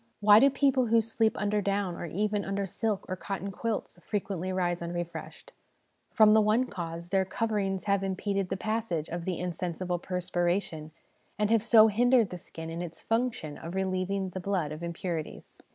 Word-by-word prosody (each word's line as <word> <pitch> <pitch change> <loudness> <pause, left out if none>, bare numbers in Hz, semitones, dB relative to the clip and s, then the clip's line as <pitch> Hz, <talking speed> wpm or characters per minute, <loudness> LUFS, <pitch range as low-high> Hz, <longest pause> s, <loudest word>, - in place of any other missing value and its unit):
Why 210 0 +8
do 275 - +6
people 270 -2 +2
who 230 +1 +5
sleep 225 0 0
under 210 0 0
down, 200 -2 -1
or 170 - -5
even 205 +4 -1
under 195 +1 -2
silk 205 +2 -2
or 185 - -2
cotton 195 +1 -5
quilts, 215 -3 -3
frequently 190 -3 -3
rise 175 -2 0
un 170 0 -4
refreshed? 175 -1 -6 0.6
From 215 -1 +6
the 220 - +6
one 215 +4 +3
cause: 170 -5 -6
their 195 0 +3
coverings 195 -2 -1
have 200 -1 +1
impeded 195 0 -1
the 190 - -2
passage 215 -7 -2
of 170 0 -4
the 185 -3 -2
insensible 180 0 -3
perspiration, 175 -2 -2 0.5
and 210 +1 +3
so 220 0 +7
have 210 -1 -3
hindered 245 -3 +4
the 180 - -6
skin 165 0 -8
in 165 +1 -4
its 170 -2 -7
function 225 -10 -1
of 170 +3 -7
relieving 190 0 -1
the 185 - -6
blood 180 -5 -1
of 155 +2 -7
impurities. 170 -1 -5
195 Hz, 180 wpm, -29 LUFS, 175-215 Hz, 0.6 s, Why